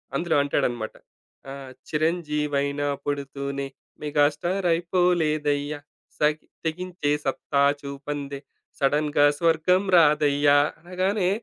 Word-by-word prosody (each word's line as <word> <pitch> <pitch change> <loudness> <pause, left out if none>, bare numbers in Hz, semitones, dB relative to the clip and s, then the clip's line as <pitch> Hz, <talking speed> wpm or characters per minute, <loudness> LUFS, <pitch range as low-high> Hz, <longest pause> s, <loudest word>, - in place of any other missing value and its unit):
అందులో 165 +3 0
అంటాడన్నమాట. 120 -5 -1 0.6
ఆహ్, 135 -1 -8 0.2
చిరంజీవైన 150 -3 -1 0.2
పుడుతూనే 140 -1 -3 0.4
మెగా‌స్టార్ 150 +6 +1
అయిపోలేదయ్యా 155 -4 +1 0.4
సగి 150 +1 +1 0.2
తెగించే 170 -2 -2
సత్తా 140 +1 0 0.2
చూపందే 140 0 -5 0.4
సడెన్‌గా 145 +1 +3
స్వర్గం 170 +3 +3
రాదయ్యా 145 -2 +4 0.2
అనగానే 185 +2 0
150 Hz, 80 wpm, -25 LUFS, 140-170 Hz, 0.6 s, రాదయ్యా